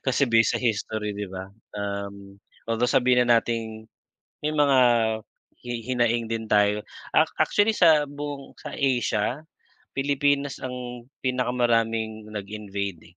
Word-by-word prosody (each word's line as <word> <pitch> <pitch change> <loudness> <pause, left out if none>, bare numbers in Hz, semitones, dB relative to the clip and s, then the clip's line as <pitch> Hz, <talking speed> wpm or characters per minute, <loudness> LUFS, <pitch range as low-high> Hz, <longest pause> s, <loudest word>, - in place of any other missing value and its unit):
Kasi 130 +1 +3
base 115 0 +4
sa - - +1
history, 110 -2 -1
'di 105 0 -4
ba, 95 +1 -8 0.2
um, 100 -1 -5 0.3
although, 115 +2 +2
sabihin 125 -2 +3
na 120 -1 +6
nating, 110 -1 -5 0.5
may 155 - +1
mga, 145 -3 +4 0.9
hi 120 0 -4
hinaing 120 -2 +1
din 115 -1 -2
tayo. 105 0 +3 0.3
A - - +7 0.2
actually 210 +2 +3
sa 160 -7 +5
buong 145 -1 -7
sa 150 - -7
Asia, 125 -1 0 0.6
Pilipinas 140 0 +1
ang 125 -1 -6 0.2
pinakamaraming 115 -3 0
nag-invade, 100 -4 -6
115 Hz, 125 wpm, -25 LUFS, 105-130 Hz, 0.9 s, A